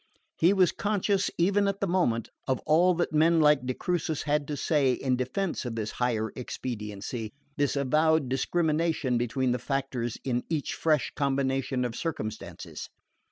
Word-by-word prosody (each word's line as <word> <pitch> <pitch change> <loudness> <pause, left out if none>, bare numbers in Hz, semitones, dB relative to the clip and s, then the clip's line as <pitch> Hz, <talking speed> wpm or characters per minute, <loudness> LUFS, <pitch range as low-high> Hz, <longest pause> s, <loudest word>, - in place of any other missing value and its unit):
He 170 +3 +5
was 190 -3 +4
conscious, 200 -1 0
even 200 +4 +3
at 200 0 -1
the - - +1
moment, 170 - +1 0.2
of 130 - +2
all 175 +4 +4
that 175 -1 -1
men 165 +2 +4
like 150 -4 +4
de 130 - -1
Crucis 165 -4 -1
had 150 -1 0
to 150 - -3
say 140 -3 +2
in 130 0 0
defence 145 +9 -2
of 120 -3 -4
this 110 -1 -3
higher 110 -3 -1
expediency, 110 -2 -5 0.3
this 145 -1 +1
avowed 155 +2 +2
discrimination 155 -1 0
between 125 +2 0
the 125 - 0
factors 130 -3 -2
in 125 -2 -1
each 155 -3 -1
fresh 155 -3 +1
combination 135 -2 0
of 120 -1 -4
circumstances. 110 -10 -5
140 Hz, 160 wpm, -28 LUFS, 125-165 Hz, 0.3 s, He